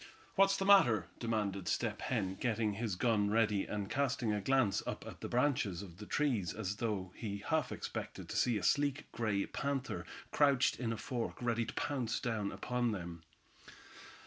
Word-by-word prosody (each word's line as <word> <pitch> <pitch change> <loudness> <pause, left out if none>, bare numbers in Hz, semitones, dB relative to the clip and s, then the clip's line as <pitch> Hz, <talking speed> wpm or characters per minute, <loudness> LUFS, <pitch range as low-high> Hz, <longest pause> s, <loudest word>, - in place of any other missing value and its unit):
"What's 195 0 +4
the 195 - -1
matter?" 120 - +6
demanded 105 -5 -1
Step - - -1
Hen, 95 0 -1
getting 110 0 0
his 110 -2 -2
gun 105 -1 +2
ready, 105 -2 +2
and 105 -2 -3
casting 125 -4 0
a 105 - -1
glance 130 -3 +2
up - - -4
at - - -9
the - - -3
branches 120 -8 +1
of 90 -3 -11
the 105 +1 -9
trees 120 - 0
as 100 -2 -3
though 100 -5 -2
he 100 -3 -5
half 160 -2 +1
expected - - -5
to - - -4
see 120 -3 +3
a 100 - -4
sleek 145 0 +2
gray 105 -4 0
panther 135 -2 -3 0.2
crouched 140 -3 +3
in 120 -2 -1
a 115 - -2
fork, 120 +1 -3
ready 120 -1 0
to - - -6
pounce 125 -6 -1
down 110 -4 -1
upon 120 -2 -1
them. 85 -3 -6
115 Hz, 175 wpm, -35 LUFS, 100-125 Hz, 0.2 s, matter